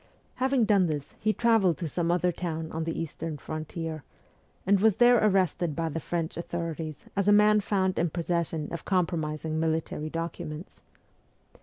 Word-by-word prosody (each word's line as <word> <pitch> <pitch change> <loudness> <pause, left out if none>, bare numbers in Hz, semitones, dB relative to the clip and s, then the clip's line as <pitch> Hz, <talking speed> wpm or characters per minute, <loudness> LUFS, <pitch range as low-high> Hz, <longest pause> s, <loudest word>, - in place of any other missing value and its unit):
Having 260 -2 +2
done 200 -4 +4
this, 150 -3 -4
he 215 - +2
travelled 220 -7 +3
to 170 - -3
some 170 +2 -1
other 180 +1 +2
town 165 -2 -4
on 160 0 -3
the 165 - -3
eastern 160 -1 -4
frontier, 155 0 -5 0.6
and 200 +1 +4
was 215 -1 +4
there 245 -1 +5
arrested 185 -6 +2
by 165 -1 -1
the 165 - -3
French 165 0 -3
authorities 165 -3 -4
as 200 0 0
a - - +6
man 210 +1 +6
found 190 -2 0
in 170 +1 +2
possession 170 -2 -2
of 170 - -5
compromising 160 -4 -1
military 160 -1 -1
documents. 165 0 -6
170 Hz, 160 wpm, -28 LUFS, 160-195 Hz, 0.6 s, a